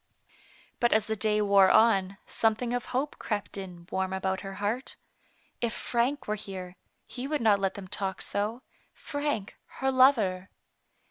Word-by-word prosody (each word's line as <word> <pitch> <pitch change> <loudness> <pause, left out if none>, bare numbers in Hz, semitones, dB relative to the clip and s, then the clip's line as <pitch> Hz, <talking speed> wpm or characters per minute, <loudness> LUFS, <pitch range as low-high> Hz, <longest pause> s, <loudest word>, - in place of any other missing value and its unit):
But 240 - +3
as 215 -1 +3
the 220 - -2
day 210 0 +2
wore 200 -2 +6
on, 200 -4 +4
something 225 +2 0
of 245 - -1
hope 270 +4 -2
crept 210 -3 -3
in 180 -3 -8
warm 190 0 -1
about 190 0 -1
her 195 -1 -7
heart. 215 +7 -2 0.7
If 235 -1 0
Frank 250 +5 -1
were 210 - 0
here, 190 -3 -7 0.3
he 255 +1 -6
would 300 0 -1
not 215 -3 +4
let 195 -1 -1
them 195 -2 -8
talk 190 0 -3
so 215 +5 -2
— - - -38 0.2
Frank, 285 -9 -2 0.2
her 265 0 +1
lover. 220 -9 +4
210 Hz, 160 wpm, -28 LUFS, 195-240 Hz, 0.7 s, wore